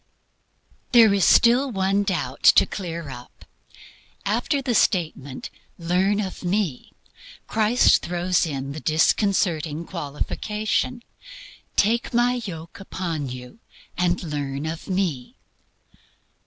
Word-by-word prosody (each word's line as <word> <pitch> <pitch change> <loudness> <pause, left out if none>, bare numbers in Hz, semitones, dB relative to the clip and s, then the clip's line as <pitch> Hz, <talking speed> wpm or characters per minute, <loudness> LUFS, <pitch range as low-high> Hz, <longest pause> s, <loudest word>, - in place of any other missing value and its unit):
There 225 -4 +7
is 195 -4 +3
still 245 +4 +5
one 195 -1 +1
doubt 200 - -3 0.2
to - - +7
clear 170 -5 -6
up. 125 -1 -12 0.8
After 285 - 0
the 265 -3 -1
statement, 155 - 0 0.3
"Learn 185 +4 +1
of 190 -2 -5
Me," 180 -7 -2 0.5
Christ 220 +3 +3
throws 175 0 0
in 135 -2 -4
the 150 - -6
disconcerting 160 -1 +1
qualification: 210 - -3 0.7
"Take 230 +4 +1
my 245 +1 +2
yoke 165 -3 -8
upon 170 -7 -4
you, 125 - -9 0.4
and 175 0 0
learn 145 -2 -4
of 160 +1 -5
Me." 180 -10 -2
180 Hz, 105 wpm, -23 LUFS, 155-210 Hz, 0.8 s, There